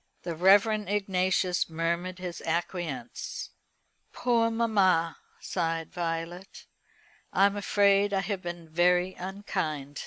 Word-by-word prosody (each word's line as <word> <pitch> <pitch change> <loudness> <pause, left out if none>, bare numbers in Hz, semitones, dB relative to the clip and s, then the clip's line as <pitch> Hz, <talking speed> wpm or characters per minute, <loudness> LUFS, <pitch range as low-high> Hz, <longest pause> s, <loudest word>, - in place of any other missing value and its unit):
The 170 -2 -4
Reverend 205 +4 +4
Ignatius 185 -3 +1
murmured 170 +3 -2
his 180 -2 -6
acquiescence. 175 +8 -4 0.6
"Poor 235 -2 +2
mamma!" 195 -8 +2 0.2
sighed 165 -2 -2
Violet, 175 +1 -4 0.7
"I 195 - +4
am 200 0 +2
afraid 200 0 +3
I 195 -1 +1
have 195 -2 -3
been 175 -2 -6
very 180 +3 +2
unkind." 155 -7 -4
185 Hz, 105 wpm, -28 LUFS, 170-200 Hz, 0.7 s, Reverend